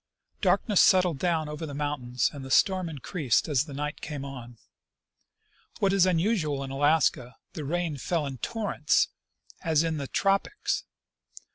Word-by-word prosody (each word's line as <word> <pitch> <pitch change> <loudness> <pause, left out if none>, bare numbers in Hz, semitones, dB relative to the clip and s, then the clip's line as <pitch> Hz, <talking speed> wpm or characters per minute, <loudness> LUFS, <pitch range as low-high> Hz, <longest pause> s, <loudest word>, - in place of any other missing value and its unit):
Darkness 205 -5 +3
settled 180 -6 +4
down 165 -2 0
over 150 +1 -5
the 145 - -7
mountains, 140 -4 -1
and 140 -2 -8
the 135 - -8
storm 185 +5 +3
in 155 - -7
creased 140 - 0
as 145 -2 +1
the 145 - -9
night 150 +1 -4
came 145 -3 -5
on. 120 -4 -9 1.2
What 195 -1 +2
is 190 -2 +4
unusual 165 -6 +1
in 135 - -6
Alaska, 145 -3 +2 0.2
the 150 - -5
rain 170 0 -2
fell 160 +3 -1
in 135 -3 -6
torrents, 205 - 0 0.5
as 160 -1 +2
in 160 -1 -1
the 140 -2 -4
tropics. 195 - 0
150 Hz, 155 wpm, -27 LUFS, 140-175 Hz, 1.2 s, settled